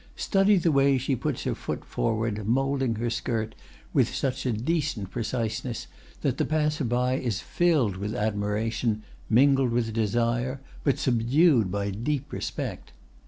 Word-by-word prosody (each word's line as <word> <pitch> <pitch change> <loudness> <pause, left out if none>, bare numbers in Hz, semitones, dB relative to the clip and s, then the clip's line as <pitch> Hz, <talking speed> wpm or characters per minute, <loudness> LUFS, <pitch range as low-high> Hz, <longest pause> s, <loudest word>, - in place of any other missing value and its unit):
Study 195 0 +3
the 170 -2 +2
way 140 -1 +4
she 130 +1 0
puts - - -2
her - - 0
foot - - -5
forward 110 -2 -1
moulding 135 0 +1
her 115 +1 -2
skirt 110 -2 -2 0.4
with - - +2
such 135 0 -1
a - - +2
decent 125 - -1
preciseness 115 0 -3 0.4
that - - 0
the - - +3
passer 150 -1 0
by 125 +2 +1
is 120 -4 -1
filled 150 - +1
with 105 +3 -3
admiration, 110 +1 -1 0.3
mingled 135 +2 +5
with 115 -2 0
desire, 120 +4 0 0.2
but 140 - +2
subdued 125 - +3
by 100 +1 -1
deep 135 +7 -3
respect. - - -5
120 Hz, 145 wpm, -27 LUFS, 110-135 Hz, 0.4 s, mingled